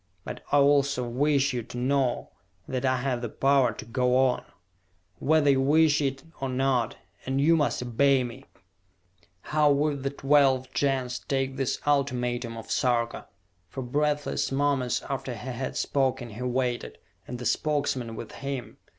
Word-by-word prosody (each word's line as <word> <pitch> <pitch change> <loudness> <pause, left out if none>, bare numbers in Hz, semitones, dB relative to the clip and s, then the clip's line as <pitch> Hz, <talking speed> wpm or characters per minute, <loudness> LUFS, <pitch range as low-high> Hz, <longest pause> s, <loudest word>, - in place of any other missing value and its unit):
"But - - -7
I 145 - +5
also 140 -3 +3
wish 140 +2 +1
you 125 - -1
to 120 +2 -9
know 130 0 0 0.4
that 130 0 -2
I 130 0 +2
have 125 -1 -1
the 120 - -3
power 135 +2 +3
to - - -9
go 125 +2 +1
on, 130 -1 +2 0.8
whether 150 -1 +4
you 135 -1 +2
wish 150 +2 +4
it 135 -1 -2 0.2
or 135 -1 -2
not 130 -3 0 0.3
and 135 +1 0
you 160 +4 +5
must 145 -5 0
obey 130 +2 +3
me!" 125 +3 -8 1.0
How 150 -1 +2
would 145 0 +1
the 135 - -1
twelve 135 -2 +2
Gens 130 -3 0
take 135 -1 -2
this 135 -2 -1
ultimatum 125 -5 0
of 115 - -8
Sarka? 120 -3 0 0.4
For 130 - -5
breathless 145 +4 0
moments 135 -2 0
after 135 -2 -4
he 115 +4 -7
had 130 +2 -4
spoken 130 -4 0
he 110 +4 -8
waited, 125 -1 -2 0.3
and 125 - -5
the 125 - -7
Spokesmen 130 -3 0
with - - -7
him. 135 -3 -6
135 Hz, 160 wpm, -27 LUFS, 125-140 Hz, 1.0 s, I